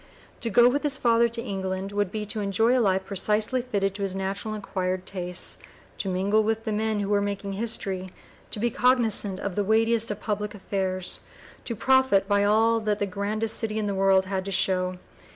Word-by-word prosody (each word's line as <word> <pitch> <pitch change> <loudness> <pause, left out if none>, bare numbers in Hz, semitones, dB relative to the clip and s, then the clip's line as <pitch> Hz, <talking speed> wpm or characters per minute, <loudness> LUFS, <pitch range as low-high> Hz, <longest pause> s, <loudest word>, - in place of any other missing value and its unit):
To 230 - -1
go 240 +3 +6
with 280 +4 +1
his 290 -3 0
father 235 0 +3
to 230 0 -3
England 190 -2 -4
would 205 -2 -1
be 215 0 -3
to 210 +1 -2
enjoy 210 +5 +2
a 255 - +3
life 190 -3 +1
precisely 210 +6 0
fitted 200 -6 -1
to 200 - -8
his 195 -1 -2
natural 195 +3 -3
and 210 - -7
acquired 185 -1 -2
tastes, 180 -2 -1 0.4
to 195 - -1
mingle 200 +4 +2
with 225 +1 -1
the 220 - -3
men 215 0 0
who 200 - -3
were 205 -1 +2
making 200 0 -3
history, 195 -3 -3 0.4
to - - -3
be 235 +2 0
cognizant 225 -6 +2
of 200 -3 -4
the 205 - +1
weightiest 225 +2 +2
of 210 0 -4
public 210 0 -3
affairs, 190 -2 -1 0.5
to 235 - -3
profit 260 -4 +3
by 200 0 +2
all 225 +2 +3
that 210 -2 -1
the 205 - 0
grandest 210 +3 0
city 220 -1 -2
in 215 - -1
the 200 - -1
world 190 0 +3
had 190 0 -2
to 195 - -4
show. 185 -1 0
205 Hz, 205 wpm, -26 LUFS, 195-225 Hz, 0.5 s, go